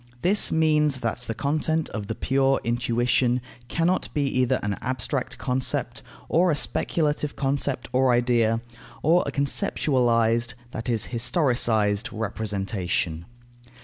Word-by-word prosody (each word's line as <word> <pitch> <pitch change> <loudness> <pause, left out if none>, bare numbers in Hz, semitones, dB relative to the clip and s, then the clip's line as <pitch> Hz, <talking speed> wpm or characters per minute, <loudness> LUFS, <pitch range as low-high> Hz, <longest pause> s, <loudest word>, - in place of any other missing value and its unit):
This 200 +4 +3
means 150 -4 +2
that 115 -1 -2
the 115 - -3
content 155 +4 0
of 105 -2 -5
the 110 - -3
pure 135 +2 +1
intuition 120 +1 +1 0.3
cannot 170 +6 0
be 145 -1 +1
either 130 0 +2
an 100 0 -1
abstract 130 +1 -2
concept, 130 0 -2 0.3
or 175 +2 +3
a 155 - +2
speculative 150 -1 -1
concept 135 -1 -1
or 130 0 +3
idea, 120 -2 +2 0.4
or 170 +4 +4
a - - -2
conceptualized, 120 - +1 0.2
that 115 +2 -4
is 115 -3 0
historicized, 120 - +2
representation. 100 -6 -2
125 Hz, 120 wpm, -25 LUFS, 115-145 Hz, 0.4 s, or